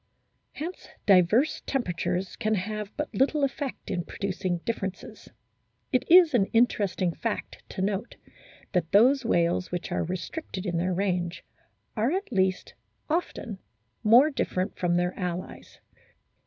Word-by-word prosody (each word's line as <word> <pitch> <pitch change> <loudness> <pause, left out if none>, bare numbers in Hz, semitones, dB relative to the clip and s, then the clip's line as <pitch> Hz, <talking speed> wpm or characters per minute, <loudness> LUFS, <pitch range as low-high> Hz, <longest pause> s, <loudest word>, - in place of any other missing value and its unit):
Hence 335 +5 -6 0.2
diverse 205 - +4
temperatures 180 - -2
can 220 -1 0
have 210 +1 -4
but 300 0 -3
little 285 +2 +2
effect 275 0 -3
in 175 - -1
producing 185 -1 -3
differences. 195 -5 -5 0.6
It 255 - +1
is 345 -3 +8
an 195 -6 +3
interesting 200 -6 +2
fact 230 +4 -4
to 190 - -3
note 200 +3 -2 0.6
that 175 -3 0
those 260 +7 +5
whales 175 -4 +1
which 175 0 -4
are - - 0
restricted 185 - -5
in 175 -3 -1
their 180 +2 0
ran^e 180 -2 -1 0.6
are 230 +4 +1
at 385 -5 -3
least 190 -3 0 0.4
often 250 - -2 0.4
more 245 +8 +6
different 185 -8 -2
from 175 -1 0
their 180 +1 +1
o - - -4
allies. 180 0 -5
200 Hz, 135 wpm, -27 LUFS, 180-250 Hz, 0.6 s, is